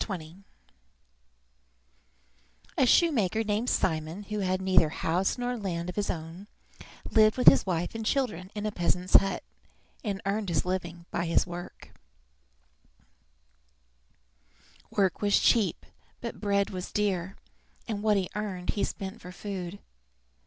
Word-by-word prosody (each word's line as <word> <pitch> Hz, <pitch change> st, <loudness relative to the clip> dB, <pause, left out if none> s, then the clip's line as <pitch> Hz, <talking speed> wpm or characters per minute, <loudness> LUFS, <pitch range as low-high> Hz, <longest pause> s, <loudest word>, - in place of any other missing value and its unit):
WHAT 195 Hz, -4 st, -2 dB
MEN 155 Hz, -2 st, -10 dB
LIVE 170 Hz, -, -16 dB, 2.4 s
BY -, -, +1 dB
A -, -, +6 dB
shoemaker 225 Hz, -, +3 dB
named 215 Hz, +3 st, 0 dB
Simon, 160 Hz, +3 st, -1 dB
who 210 Hz, +1 st, -4 dB
had 185 Hz, -1 st, 0 dB
neither 185 Hz, -4 st, +4 dB
house 175 Hz, +7 st, 0 dB
nor 245 Hz, 0 st, -2 dB
land 180 Hz, -6 st, -3 dB
of -, -, -16 dB
his 205 Hz, -1 st, -1 dB
own, 165 Hz, +4 st, -5 dB, 0.6 s
lived 215 Hz, 0 st, +5 dB
with 250 Hz, -, -1 dB
his -, -, +8 dB
wife 175 Hz, -1 st, -1 dB
and 225 Hz, 0 st, -4 dB
children 215 Hz, -, -1 dB
in 210 Hz, 0 st, -3 dB
a 215 Hz, -, 0 dB
peasant's 180 Hz, -1 st, -1 dB
hut, 195 Hz, 0 st, 0 dB, 0.6 s
and 200 Hz, -4 st, -2 dB
earned 200 Hz, 0 st, -1 dB
his 170 Hz, -, 0 dB
living 175 Hz, -2 st, -3 dB
by 170 Hz, -, -1 dB
his 165 Hz, -, +3 dB
work. 175 Hz, 0 st, -9 dB, 3.0 s
Work 195 Hz, -3 st, +1 dB
was 205 Hz, -1 st, +4 dB
cheap, 210 Hz, -8 st, +2 dB, 0.3 s
but 235 Hz, -, -6 dB
bread 200 Hz, -1 st, +1 dB
was 185 Hz, -1 st, -5 dB
dear, 190 Hz, -3 st, -1 dB, 0.5 s
and 215 Hz, -3 st, -3 dB
what 210 Hz, -1 st, +3 dB
he 190 Hz, -2 st, 0 dB
earned 195 Hz, -4 st, -3 dB
he 205 Hz, -, -2 dB
spent 195 Hz, +3 st, -5 dB
for 180 Hz, -, -9 dB
food. 185 Hz, -1 st, -6 dB
195 Hz, 145 wpm, -28 LUFS, 180-210 Hz, 3.0 s, his